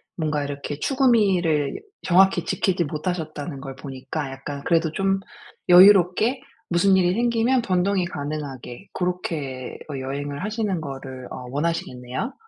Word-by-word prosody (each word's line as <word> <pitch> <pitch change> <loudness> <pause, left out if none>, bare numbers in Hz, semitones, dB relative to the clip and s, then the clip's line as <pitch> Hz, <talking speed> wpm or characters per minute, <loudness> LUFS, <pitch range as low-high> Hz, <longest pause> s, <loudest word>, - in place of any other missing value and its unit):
뭔가 155 -3 -1
이렇게 145 0 -5
추구 270 - +1
미를 180 - +2 0.2
정확히 190 +2 +4
지키지 185 -2 +1
못하셨다는 155 -2 -4
걸 135 -1 -7
보니까 135 +2 -5
약간 140 +1 -6
그래도 165 -2 +2
좀 195 +3 0 0.5
여유롭게 190 +6 +6 0.3
무슨 185 +3 +4
일이 180 -1 +3
생기면 235 +2 +2
변동이 185 -2 +1
가능하게 145 -2 -6
고렇게 155 -8 -3 0.2
어 140 - -4
여행을 140 +3 -4
하시는 210 -4 -1
거를 135 -3 -7
어 125 - -7
원하시겠네요? 140 - -3
165 Hz, 320 characters per minute, -23 LUFS, 140-190 Hz, 0.5 s, 여유롭게